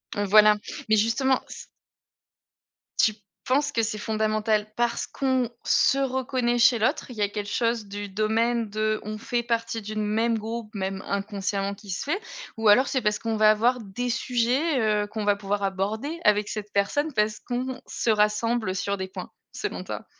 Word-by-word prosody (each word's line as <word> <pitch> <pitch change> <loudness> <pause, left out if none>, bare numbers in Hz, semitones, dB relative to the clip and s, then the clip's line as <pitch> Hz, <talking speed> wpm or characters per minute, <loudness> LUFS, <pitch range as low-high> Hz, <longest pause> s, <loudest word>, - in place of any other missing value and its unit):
Heu, 205 - 0
voilà, 210 +1 +7 0.3
mais 220 - +5
justement 245 +5 +2
s - - -9 1.3
Tu 215 - +4 0.3
penses 285 +3 +2
que 230 - +1
c'est 220 -1 -1
fondamental 215 0 0
parce 240 0 0
qu'on 260 -3 0
se 275 - +3
reconnaît 260 -2 0
chez 235 0 +5
l'autre? 260 +6 0
Il - - -9
y - - -3
a 205 - +2
quelque 205 0 -5
chose 230 -2 0
du 205 0 -6
domaine 220 +3 0
de, 215 +1 0
on 215 +1 -5
fait 240 +2 -2
partie 230 -1 -1
d'une 215 0 -3
même 225 +2 +1
groupe 220 0 -6
même 190 -1 -3
inconsciemment 200 0 -2
qui 200 0 -14
se 180 - -2
fait, 340 +9 -1 0.4
ou 225 -1 +3
alors 250 +6 +6
c'est 260 - 0
parce 210 -1 0
qu'on 225 -1 -2
va 215 0 +6
avoir 235 +4 +2
des 225 +4 -4
sujets, 255 +5 +1 0.2
heu, - - -5
qu'on 215 0 -4
va 205 -1 +4
pouvoir 200 0 -2
aborder 210 - -2
avec 210 -1 +3
cette 210 -1 -5
personne 290 +10 +1
parce 210 -2 +1
qu'on 255 +1 -4
se - - -2
rassemble 210 -1 +1
sur 200 +1 -1
des 190 0 -4
points 185 - -8 0.2
selon - - -4
toi? - - -6
220 Hz, 180 wpm, -25 LUFS, 210-240 Hz, 1.3 s, voilà